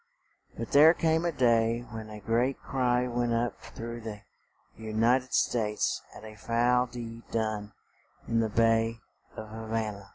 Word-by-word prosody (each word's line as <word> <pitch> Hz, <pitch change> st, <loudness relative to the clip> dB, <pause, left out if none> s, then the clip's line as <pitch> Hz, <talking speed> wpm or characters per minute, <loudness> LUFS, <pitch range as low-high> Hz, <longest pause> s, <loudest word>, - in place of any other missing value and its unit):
But -, -, -5 dB
there 155 Hz, +4 st, +7 dB
came 160 Hz, +1 st, +1 dB
a 170 Hz, -, +1 dB
day 115 Hz, -3 st, +2 dB
when 110 Hz, -1 st, -7 dB
a 105 Hz, 0 st, -8 dB
great 120 Hz, +5 st, 0 dB
cry 125 Hz, -2 st, 0 dB
went 120 Hz, -1 st, 0 dB
up 120 Hz, +1 st, -2 dB
through 115 Hz, +1 st, -7 dB
the 105 Hz, -2 st, -7 dB, 0.6 s
U 110 Hz, -1 st, -7 dB
nit 120 Hz, +4 st, +4 dB
ed 130 Hz, -, -23 dB
States 105 Hz, -3 st, +1 dB
at 110 Hz, -, -11 dB
a 110 Hz, -, -9 dB
foul 120 Hz, +3 st, +1 dB
deed 115 Hz, -1 st, -9 dB
done 110 Hz, -2 st, -2 dB, 0.5 s
in 115 Hz, 0 st, +1 dB
the 110 Hz, -1 st, +1 dB
bay 115 Hz, +1 st, +2 dB, 0.4 s
of 110 Hz, -, -6 dB
Ha 110 Hz, +1 st, -7 dB
va 110 Hz, -1 st, -1 dB
na. 100 Hz, -1 st, -11 dB
115 Hz, 170 wpm, -29 LUFS, 110-120 Hz, 0.6 s, there